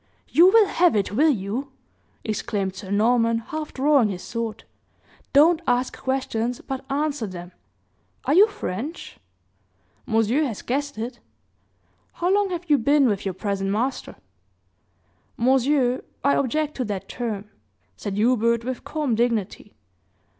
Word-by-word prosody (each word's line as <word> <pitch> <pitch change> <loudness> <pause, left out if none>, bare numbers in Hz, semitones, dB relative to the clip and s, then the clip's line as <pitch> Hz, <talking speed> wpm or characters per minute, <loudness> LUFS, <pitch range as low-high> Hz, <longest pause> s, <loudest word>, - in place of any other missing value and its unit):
"You 340 +3 +6
will 440 +1 +6
have 355 - +2
it, 200 -3 0
will 295 +9 +3
you?" 250 +3 -2 0.5
exclaimed 205 -3 -2
Sir 190 0 -9
Norman, 230 +3 +3
half 305 +7 -5
drawing 275 -4 +3
his 180 -3 -5
sword. 230 -2 -4 0.7
"Don't 315 +4 +5
ask 250 0 +1
questions, 250 -3 -2
but 265 -1 -6
answer 285 -4 -1
them. 175 -1 -9 0.7
Are 280 - +2
you 395 +6 +7
French?" 295 - -6 0.9
"Monsieur 225 +5 +2
has 250 -9 -3
guessed 285 +1 -2
it." 240 +2 -5 0.9
"How 355 +2 0
long 405 -1 +2
have 350 -1 -5
you 290 -2 +4
been 280 +3 +4
with 205 -3 -1
your 190 -2 -2
present 195 0 -2
master?" 235 +7 -2 1.2
"Monsieur, 260 +1 +2 0.2
I 280 - +4
object 300 +3 0
to 255 - -1
that 205 -3 -4
term," 215 -4 -5 0.4
said 195 - -5
Hubert, 235 +1 +2
with 255 -1 -4
calm 300 -6 -2
dignity. 225 -3 -1
245 Hz, 135 wpm, -23 LUFS, 215-290 Hz, 1.2 s, you